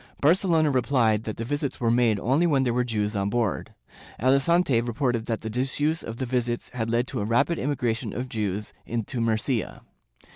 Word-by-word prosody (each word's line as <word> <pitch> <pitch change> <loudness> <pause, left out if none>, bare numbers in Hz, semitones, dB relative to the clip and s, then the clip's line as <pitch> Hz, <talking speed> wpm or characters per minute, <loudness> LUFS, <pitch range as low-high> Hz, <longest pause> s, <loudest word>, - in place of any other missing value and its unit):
Barcelona 165 -1 +3
repUed 120 -5 +2
that 110 - -4
the 115 - -4
visits 145 +2 -3
were 115 -2 +2
made 115 -3 +3
only 140 - +2
when 140 -5 +3
there 120 -2 +1
were 125 +1 +2
Jews 105 -3 -2
on 100 0 0
board. 115 -4 -1 0.4
Alicante 135 +1 +3
reported 120 -1 -1
that 115 -2 -2
the 110 - -4
disuse 140 +6 0
of 115 0 -7
the 130 - -2
visits 120 -1 -2
had 115 -3 -3
led 120 +1 +1
to - - -3
a - - -1
rapid 120 +10 +1
immigration 125 -5 -1
of 125 +2 -4
Jews 105 -3 -3
into 115 +1 -2
Murcia. 115 +1 -1
120 Hz, 185 wpm, -25 LUFS, 110-135 Hz, 0.4 s, Barcelona